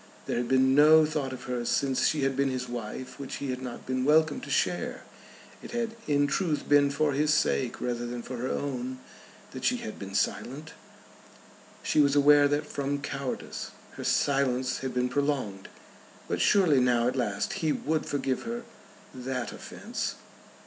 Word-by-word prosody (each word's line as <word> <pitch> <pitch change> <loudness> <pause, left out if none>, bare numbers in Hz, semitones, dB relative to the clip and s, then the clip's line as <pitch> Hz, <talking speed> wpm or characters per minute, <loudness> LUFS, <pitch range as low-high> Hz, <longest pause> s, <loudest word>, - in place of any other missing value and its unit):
There - - -2
had 120 0 -1
been 130 +1 +4
no 155 +2 +7
thought 150 -3 -2
of 130 -1 -7
hers 125 -2 -2
since 135 -2 +2
she 150 -3 0
had 135 0 +1
been 140 0 +2
his 130 -1 -3
wife 120 +1 -6
which 140 - -5
he 140 -2 -3
had 125 0 -4
not 125 -2 -7
been 130 0 -1
welcome 155 - +3
to - - -9
share. - - 0 0.6
It - - -10
had 230 -1 -2
in 145 -1 +3
truth 155 +1 -1
been 145 -1 +5
for 145 +1 +1
his 150 +2 +2
sake 135 -4 +1
rather 120 -1 -2
than 120 0 -5
for 130 - -6
her 125 +2 -3
own 130 -2 -3 0.5
that - - -8
she - - +2
had 110 - -7
been 100 0 -7
silent. 135 +11 -2 1.1
She - - +1
was 140 -1 +4
aware 145 0 +6
that 145 +1 0
from 140 -1 -2
cowardice 140 -2 -5 0.2
her - - -8
silence 130 -2 +1
had 130 -1 -4
been 125 0 +2
prolonged. 130 -8 -2 0.6
But - - -1
surely 180 -9 +5
now 120 -1 +3
at 125 - 0
last 105 -6 -1
he 160 -2 +2
would 155 +1 -1
forgive 135 -2 -1
her 235 +1 -5 0.5
that 130 -1 -4
offence. - - -5
135 Hz, 175 wpm, -28 LUFS, 125-145 Hz, 1.1 s, no